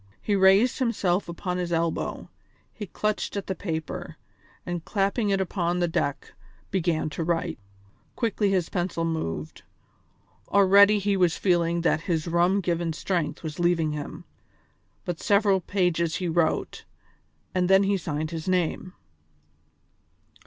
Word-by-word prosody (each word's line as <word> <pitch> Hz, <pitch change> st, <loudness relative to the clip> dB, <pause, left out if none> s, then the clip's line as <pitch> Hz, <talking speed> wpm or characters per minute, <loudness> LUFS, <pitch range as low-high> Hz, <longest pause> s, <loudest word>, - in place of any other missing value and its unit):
He 205 Hz, -, 0 dB
raised 195 Hz, +7 st, +4 dB
himself 205 Hz, -8 st, 0 dB
upon 180 Hz, +1 st, -3 dB
his 175 Hz, -1 st, -3 dB
elbow, 165 Hz, -1 st, -1 dB, 0.5 s
he 210 Hz, -2 st, -7 dB
clutched 210 Hz, +1 st, -2 dB
at 200 Hz, -, -3 dB
the 190 Hz, -, -2 dB
paper, 160 Hz, -5 st, -5 dB, 0.5 s
and 175 Hz, -2 st, -4 dB
clapping 200 Hz, +3 st, 0 dB
it 195 Hz, -1 st, +2 dB
upon 175 Hz, -2 st, -1 dB
the 175 Hz, -1 st, +1 dB
deck 160 Hz, -4 st, -2 dB, 0.4 s
began 170 Hz, -4 st, 0 dB
to 165 Hz, -, -3 dB
write. 165 Hz, -2 st, -1 dB, 0.6 s
Quickly 220 Hz, -3 st, 0 dB
his 185 Hz, -4 st, +1 dB
pencil 175 Hz, -2 st, -2 dB
moved; 160 Hz, -, -4 dB, 0.9 s
already 200 Hz, +1 st, +6 dB
he 200 Hz, 0 st, 0 dB
was 180 Hz, -3 st, +2 dB
feeling 170 Hz, -2 st, +1 dB
that 165 Hz, -1 st, +1 dB
his 165 Hz, -2 st, -2 dB
rum 175 Hz, +4 st, +2 dB
given 170 Hz, -2 st, -1 dB
strength 170 Hz, -1 st, -2 dB
was 155 Hz, 0 st, -6 dB
leaving 170 Hz, -3 st, +2 dB
him, 150 Hz, -1 st, -6 dB, 0.8 s
but 175 Hz, -2 st, -4 dB
several 200 Hz, -1 st, +3 dB
pages 170 Hz, -3 st, 0 dB
he 180 Hz, -, -2 dB
wrote, 165 Hz, -1 st, 0 dB, 0.7 s
and 180 Hz, -1 st, +1 dB
then 190 Hz, +1 st, +6 dB
he 200 Hz, +1 st, +2 dB
signed 155 Hz, -3 st, -3 dB
his 165 Hz, 0 st, -5 dB
name. 180 Hz, 0 st, -1 dB
175 Hz, 140 wpm, -26 LUFS, 165-195 Hz, 0.9 s, already